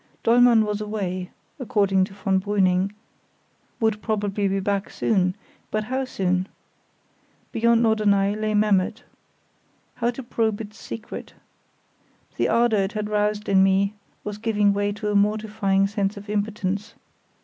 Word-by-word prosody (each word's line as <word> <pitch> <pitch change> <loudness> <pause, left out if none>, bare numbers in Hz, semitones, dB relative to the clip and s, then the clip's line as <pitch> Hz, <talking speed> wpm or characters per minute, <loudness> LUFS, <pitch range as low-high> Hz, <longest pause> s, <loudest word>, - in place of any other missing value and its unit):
Dollmann 235 -1 +5
was 210 0 -2
away 190 -4 -3 0.3
(according 200 -7 +2
to 195 - -13
von 190 -1 0
Brüning), 190 -1 +1 0.9
"would 220 -2 +1
probably 205 -2 -1
be 195 0 0
back 200 0 -1
soon"; 185 -4 +1 0.3
but 215 0 -1
how 260 +4 -2
soon? 185 -5 -1 1.0
Beyond 235 +1 +3
Norderney 205 -3 +2
lay 215 0 -1
Memmert. 210 +2 +2 0.9
How 235 0 -1
to 245 +2 -5
probe 225 -3 -1
its 215 -1 -9
secret? 225 0 -8 1.0
The - - +1
ardour 235 -3 +3
it 195 0 -1
had 210 -1 -3
roused 210 0 0
in 195 -1 +4
me 195 +1 +3 0.3
was 210 0 -5
giving 210 -2 +2
way 205 0 0
to 210 +1 -4
a - - -1
mortifying 205 -1 +2
sense 200 0 -1
of 205 +1 -8
impotence. 205 -1 -2
210 Hz, 140 wpm, -24 LUFS, 195-220 Hz, 1.0 s, Dollmann